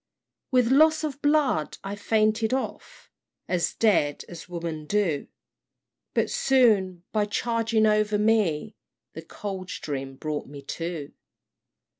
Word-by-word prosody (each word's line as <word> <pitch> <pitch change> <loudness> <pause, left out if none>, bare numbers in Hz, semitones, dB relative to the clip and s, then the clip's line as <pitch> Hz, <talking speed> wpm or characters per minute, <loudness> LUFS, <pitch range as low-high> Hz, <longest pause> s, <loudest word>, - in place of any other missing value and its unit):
"With 250 -2 +3
loss 310 +3 +5
of 290 -2 -4
blood 290 - +1
I 195 +1 -4
fainted 220 +2 +1
off, - - -6 0.4
As 175 -2 0
dead 170 -10 +2
as 175 +1 -10
women 165 -3 -5
do 180 -8 0 0.9
But - - +1
soon 220 - +3
by 210 -1 +1
charging 225 +1 +1
over 215 0 +2
me, 210 -4 +1 0.4
The - - -7
Coldstream 155 -9 -6
brought 150 +2 -4
me 140 0 -10
to. 165 0 -5
210 Hz, 115 wpm, -26 LUFS, 165-230 Hz, 0.9 s, loss